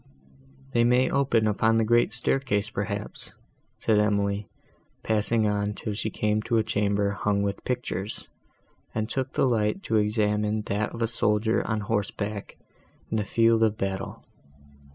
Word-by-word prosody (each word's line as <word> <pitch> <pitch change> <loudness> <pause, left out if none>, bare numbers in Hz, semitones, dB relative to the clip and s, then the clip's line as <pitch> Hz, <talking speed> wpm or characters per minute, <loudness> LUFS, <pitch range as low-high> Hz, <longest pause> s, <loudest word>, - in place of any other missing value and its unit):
"They 120 -2 +3
may 125 +2 +3
open 130 -5 +2
upon 110 +2 +2
the 115 - +3
great 120 +1 +3
staircase, 115 -3 0
perhaps," 100 0 -4 0.4
said 110 -2 +2
Emily, 100 -1 +1 0.6
passing 110 +1 +1
on 105 0 0
till 105 - -4
she 110 +1 -2
came 105 0 0
to 115 +1 0
a 110 - +3
chamber, 100 -1 0
hung 100 +1 0
with 100 0 -3
pictures, 115 -5 -3 0.7
and 110 -1 -1
took 130 +2 -2
the - - +2
light 115 - +1
to 110 - +1
examine 105 0 +1
that 105 +1 -1
of 115 - -2
a - - +2
soldier 110 0 +1
on 110 -2 -1
horseback 105 -1 -3 0.5
in 110 - +1
a - - 0
field 115 +2 +3
of 110 -1 +2
battle. 95 -1 -4
105 Hz, 155 wpm, -26 LUFS, 105-115 Hz, 0.7 s, They